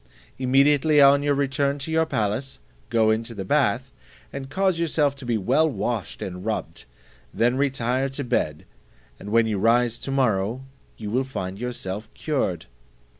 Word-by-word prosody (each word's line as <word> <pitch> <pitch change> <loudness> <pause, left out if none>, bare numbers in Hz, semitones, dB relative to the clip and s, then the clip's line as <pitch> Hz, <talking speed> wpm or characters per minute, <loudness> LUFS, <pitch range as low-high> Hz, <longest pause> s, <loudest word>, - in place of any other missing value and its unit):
Immediately 140 +3 +4
on 140 0 +7
your 145 0 +1
return 140 0 0
to 145 +3 -6
your 160 0 +2
palace, 110 +1 -2 0.3
go 110 -2 +3
into 115 +1 -2
the 95 -2 -5
bath, - - +1 0.4
and 135 -1 -6
cause 190 +1 +1
yourself 150 -4 +1
to 130 - -8
be 115 -2 +1
well 135 +10 +2
washed 120 -7 -3
and 90 -1 -6
rubbed; 110 - -4 0.5
then 120 +2 +1
retire 135 -1 0
to 135 +2 -5
bed, 75 - -1 0.5
and 105 - -8
when 115 +1 +4
you 105 -3 -1
rise 120 +2 +2
to - - -7
morrow 120 -3 0 0.3
you 105 -2 -6
will 130 +3 +1
find 95 -7 -5
yourself 110 -3 -5
cured." 115 - -2
125 Hz, 160 wpm, -24 LUFS, 110-140 Hz, 0.5 s, on